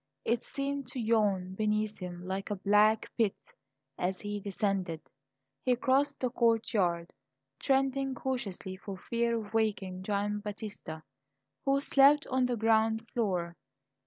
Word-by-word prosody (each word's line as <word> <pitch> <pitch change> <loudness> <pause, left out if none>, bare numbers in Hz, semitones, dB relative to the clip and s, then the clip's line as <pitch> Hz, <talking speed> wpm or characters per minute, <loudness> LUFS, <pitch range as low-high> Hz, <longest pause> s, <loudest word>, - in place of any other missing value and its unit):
It 235 0 +1
seemed 275 -1 -3
to 260 - -4
yawn 205 -5 +1
beneath 215 +1 0
him 180 -1 -7
like 190 +2 -3
a 205 - -1
black 210 +3 +3
pit 215 -4 +3 0.6
as 185 +1 -1
he 205 0 -3
descended. 195 -4 -1 0.6
He 250 -1 +3
crossed 275 +4 +1
the 255 -2 0
courtyard, 210 -8 +1 0.5
treading 270 0 +1
cautiously 220 -8 -3
for 195 0 -7
fear 235 +3 0
of 215 -1 -7
waking 200 -4 0
Gian 205 +1 -1
Battista, 205 -6 -6 0.6
who 275 0 +3
slept 285 +1 +5
on 260 0 +3
the 245 -1 -1
ground 225 0 +2
floor. 180 -7 -1
215 Hz, 130 wpm, -31 LUFS, 195-240 Hz, 0.6 s, slept